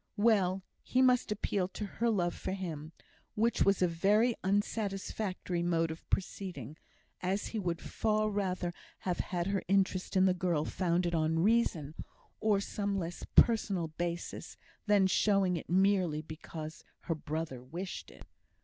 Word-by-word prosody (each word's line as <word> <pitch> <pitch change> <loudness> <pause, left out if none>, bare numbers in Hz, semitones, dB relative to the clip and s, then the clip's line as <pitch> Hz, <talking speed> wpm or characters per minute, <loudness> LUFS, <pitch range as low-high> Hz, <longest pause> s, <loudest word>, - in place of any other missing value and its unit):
Well, 195 -4 +3 0.2
he 255 - 0
must 250 -3 +4
appeal 200 -2 0
to 210 +2 -5
her 230 +4 -1
love 175 -6 +1
for - - -4
him, 160 -5 -5 0.4
which 230 +2 +1
was 195 -2 +4
a - - +5
very 205 +8 +3
unsatisfactory 195 -2 -1
mode 165 -2 +1
of 160 - -10
proceeding, 175 - -3 0.5
as 190 +3 -1
he 225 - -3
would 175 -4 -1
far 215 -1 0
rather 185 -3 -1 0.3
have 180 -2 -2
had 175 -2 -1
her 195 0 0
interest 190 0 +1
in 185 - +6
the 185 - +4
girl 175 -4 0
founded 175 -1 0
on 160 0 +1
reason, 190 -9 +2 0.5
or 210 -2 +3
some 200 0 -2
less 175 -2 -4
personal 200 -8 +4
basis 170 +2 -4 0.3
than 205 -2 +5
showing 195 -1 +3
it 165 - -6
merely 185 -4 +3
because 155 0 -8 0.2
her 165 - -1
brother 155 -4 -4
wished 175 +9 -6
it. - - -14
185 Hz, 150 wpm, -32 LUFS, 170-200 Hz, 0.5 s, in